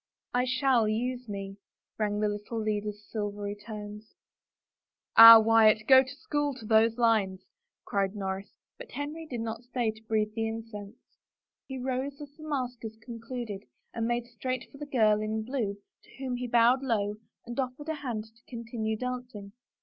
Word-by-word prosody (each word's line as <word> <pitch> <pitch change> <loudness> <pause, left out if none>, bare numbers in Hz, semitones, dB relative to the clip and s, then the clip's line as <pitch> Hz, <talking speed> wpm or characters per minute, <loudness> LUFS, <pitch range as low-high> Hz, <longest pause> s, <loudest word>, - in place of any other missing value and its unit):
" - - -53
I - - 0
shall 255 -3 +2
use 245 +2 -2
me," 195 -1 -6 0.4
rang 210 -1 0
out 210 - -2
the 210 - +2
little 210 +2 -4
leader's 210 -1 -3
silvery 205 -1 -4
tones. 210 0 -9 0.5
" - - -63
Ah, 230 0 +13
Wyatt, 220 -1 +5
go 260 -1 +9
to 265 +1 -7
school 290 -1 -2
to 230 - -10
those 225 +1 +4
lines," 215 -6 +2 0.4
cried 200 0 -1
Norris, 195 -1 -4 0.3
but - - -9
Henry 305 +3 -5
did 245 -5 -4
not 225 0 -4
stay 240 -2 -1
to 220 0 -17
breathe 215 -1 0
the 225 0 -1
incense. 220 -2 -7 0.7
He 265 - -6
rose 260 +2 -3
as 290 -2 -9
the 310 - -16
maskers 245 -5 -4
concluded 230 - -7 0.3
and 230 -1 -1
made 240 0 -1
straight 255 +2 -5
for 280 - -14
the 295 - -6
girl 215 -6 +3
in 215 +1 -2
blue 220 -5 -2 0.3
to - - -22
whom 260 -2 -3
he 250 0 -4
bowed 240 +2 +4
low 210 -5 -1 0.3
and 240 0 -6
oflFered 265 +3 -3
his 315 -2 -3
hand 240 -6 -3
to 225 +2 -22
continue 230 -2 -4
dancing. 245 -5 -5
225 Hz, 175 wpm, -29 LUFS, 215-255 Hz, 0.7 s, Ah